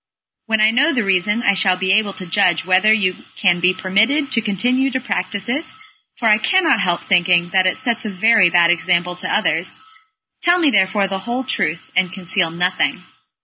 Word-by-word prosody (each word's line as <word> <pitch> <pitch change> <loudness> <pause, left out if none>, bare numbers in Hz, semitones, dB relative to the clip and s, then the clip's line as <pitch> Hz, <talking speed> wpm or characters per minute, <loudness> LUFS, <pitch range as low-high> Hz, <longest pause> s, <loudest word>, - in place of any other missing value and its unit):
When 220 -1 0
I 215 +1 +4
know 285 +8 +2
the 245 -4 0
reason 200 +4 0
I 200 - +3
shall 185 -1 +1
be 190 +1 -1
able 210 -1 +1
to 185 - -7
judge 180 0 0
whether 190 +3 +3
you 195 -4 0
can 175 -4 +1
be 180 +1 +3
permitted 220 +11 0
to 230 - +1
continue 245 +6 -1
to 260 0 -3
practise 200 -4 -3
it, 290 - -4 0.4
for 230 - -2
I 215 0 +4
cannot 335 - +2
help 175 -3 -1
thinking 175 -2 +1
that 185 -1 +2
it 185 - -1
sets 240 -3 -2
a 215 - -4
very 205 -1 +3
bad 170 0 +3
example 175 0 -1
to - - -5
others. - - -2 0.6
Tell 350 +1 +2
me 320 -5 +2
therefore 195 -1 +1
the 195 0 -4
whole 240 +6 -4
truth, 165 -10 -3
and 180 -1 +1
conceal 185 -2 -2
nothing." 180 +2 -2
195 Hz, 195 wpm, -18 LUFS, 185-230 Hz, 0.6 s, I